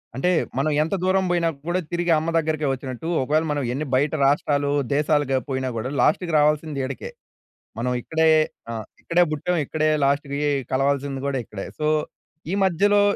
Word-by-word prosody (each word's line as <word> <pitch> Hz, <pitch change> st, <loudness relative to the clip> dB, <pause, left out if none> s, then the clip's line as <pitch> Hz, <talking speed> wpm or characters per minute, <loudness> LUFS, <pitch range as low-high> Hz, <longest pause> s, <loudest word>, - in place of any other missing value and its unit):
అంటే 135 Hz, +8 st, +1 dB, 0.3 s
'మనం 145 Hz, +3 st, +1 dB
ఎంత 165 Hz, +5 st, 0 dB
దూరం 190 Hz, 0 st, +2 dB
పోయినా 170 Hz, -1 st, +2 dB, 0.2 s
కూడా 175 Hz, +1 st, +1 dB
తిరిగి 175 Hz, 0 st, 0 dB
అమ్మ 160 Hz, +2 st, -1 dB
దగ్గరికే 155 Hz, -2 st, 0 dB
వచ్చినట్టు', 130 Hz, +4 st, -5 dB
ఒకవేళ 155 Hz, +4 st, +1 dB
మనం 145 Hz, -1 st, -1 dB
ఎన్ని 150 Hz, +4 st, -2 dB
బయట 145 Hz, +4 st, +1 dB
రాష్ట్రాలు, 145 Hz, 0 st, +1 dB, 0.2 s
దేశాలుగ 145 Hz, -2 st, +2 dB
పోయినా 130 Hz, -1 st, -1 dB
గూడా 115 Hz, +3 st, -3 dB
లాస్ట్‌కి 170 Hz, +5 st, +2 dB
రావాల్సింది 150 Hz, -1 st, +1 dB
ఈడకే. 130 Hz, 0 st, -6 dB, 0.7 s
మనం 125 Hz, +2 st, -1 dB
ఇక్కడే 160 Hz, +3 st, +2 dB, 0.4 s
ఆహ్, 110 Hz, -2 st, -5 dB, 0.2 s
ఇక్కడే 175 Hz, +1 st, +3 dB
పుట్టాం 175 Hz, +4 st, -1 dB
ఇక్కడే 155 Hz, +2 st, 0 dB, 0.2 s
లాస్ట్‌కి 140 Hz, 0 st, 0 dB, 0.3 s
కలవాల్సింది 135 Hz, 0 st, 0 dB
కూడా 140 Hz, -1 st, -1 dB
ఇక్కడే. 100 Hz, -3 st, -7 dB
సో, 150 Hz, -, -1 dB, 0.6 s
ఈ -, -, -2 dB
మధ్యలో 200 Hz, +3 st, +3 dB
150 Hz, 155 wpm, -23 LUFS, 135-165 Hz, 0.7 s, ఇక్కడే